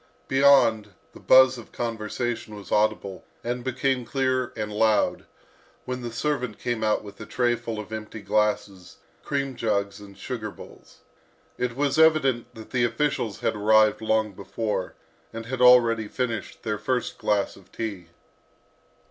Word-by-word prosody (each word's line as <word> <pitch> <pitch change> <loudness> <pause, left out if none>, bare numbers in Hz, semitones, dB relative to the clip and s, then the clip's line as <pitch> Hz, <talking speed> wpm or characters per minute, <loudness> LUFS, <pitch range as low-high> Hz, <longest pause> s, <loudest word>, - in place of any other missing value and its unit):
Beyond, 130 -7 +4 0.2
the - - -13
buzz 130 -1 +6
of 115 - -13
conversation 115 -1 -3
was 100 -1 -11
audible, 105 -3 0 0.2
and 120 +1 -3
became 130 0 0
clear 130 0 0
and 105 -1 -4
loud, 110 0 +2 0.6
when 125 0 -4
the 120 -1 -5
servant 125 -2 -2
came 120 -2 -2
out 110 0 +1
with 100 0 -11
a - - -6
trayful 120 -2 -1
of 105 +1 -7
empty 110 0 -6
glasses, 100 -2 -1 0.3
cream 140 -2 -2
jugs 100 -3 -1
and 100 -1 -13
sugar 115 -5 -5
bowls. - - -15 0.6
It 125 -1 -1
was 145 +2 0
evident 155 -7 +3
that 110 -1 -11
the 125 -2 +1
officials 120 -4 -1
had - - 0
arrived 110 +1 +4
long 110 -1 +1
before, 100 0 -4 0.4
and 115 0 -7
had 125 +1 -4
already 120 -3 +6
finished 115 -3 -4
their 105 -2 -2
first 125 +3 -2
glass 105 -1 0
of 95 - -19
tea. 100 -6 -5
115 Hz, 150 wpm, -25 LUFS, 105-125 Hz, 0.6 s, buzz